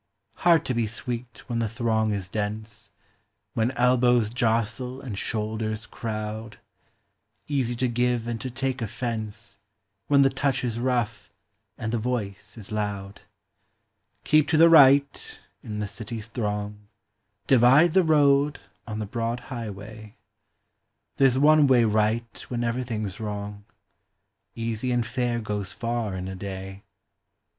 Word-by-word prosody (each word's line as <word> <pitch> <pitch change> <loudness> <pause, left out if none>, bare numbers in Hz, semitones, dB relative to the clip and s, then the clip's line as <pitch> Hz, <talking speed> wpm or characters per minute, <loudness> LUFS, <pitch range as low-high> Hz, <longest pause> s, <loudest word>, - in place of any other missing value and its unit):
Hard 170 -2 +4
to 130 - -1
be 115 -2 0
sweet 120 +1 -5
when 120 -2 -2
the 115 -2 0
throng 110 -1 0
is 100 -3 -3
dense, 105 +1 -5 0.6
When 115 +1 +1
elbows 120 -2 +3
jostle 120 +2 -1
and 125 -7 -6
shoulders 110 +1 -3
crowd; 110 -1 -5 0.9
Easy 130 -5 0
to 125 +2 0
give 120 -1 0
and 115 -1 -4
to 130 - -4
take 130 +1 -2
offence 110 -2 -5 0.5
When 140 -1 +5
the 135 - +3
touch 135 -2 0
is 120 -2 -2
rough 120 -3 -1 0.5
and 110 0 -3
the 120 - +1
voice 110 -4 -3
is 105 -2 -10
loud; 105 -2 -3 0.5
" - - -49
Keep 155 -1 +4
to 155 +1 +2
the 165 +1 +8
right 140 -2 +5
" - - -46
in 105 -1 -5
the 105 - -2
city's 110 +2 -6
throng; 105 -2 -4 0.3
" - - -51
Divide 135 +7 +6
the 190 - +6
road" 145 -2 +3 0.3
on 110 -2 -4
the 110 - -3
broad 115 +3 -2
highway; 110 -1 -8 1.0
There 135 -1 +6
's 130 - -1
one 150 +1 +6
way 125 -3 +5
right 110 +2 0
when 120 -1 -2
everything 115 -3 -2
's 95 - -9
wrong; 105 -1 -5 0.5
" - - -52 0.2
Easy 115 +2 -2
and 120 -1 +1
fair 120 0 -1
goes 105 -3 -4
far 115 -3 -2
in 90 0 -4
a 95 - -5
day." 95 0 -7
115 Hz, 150 wpm, -26 LUFS, 105-125 Hz, 1.0 s, the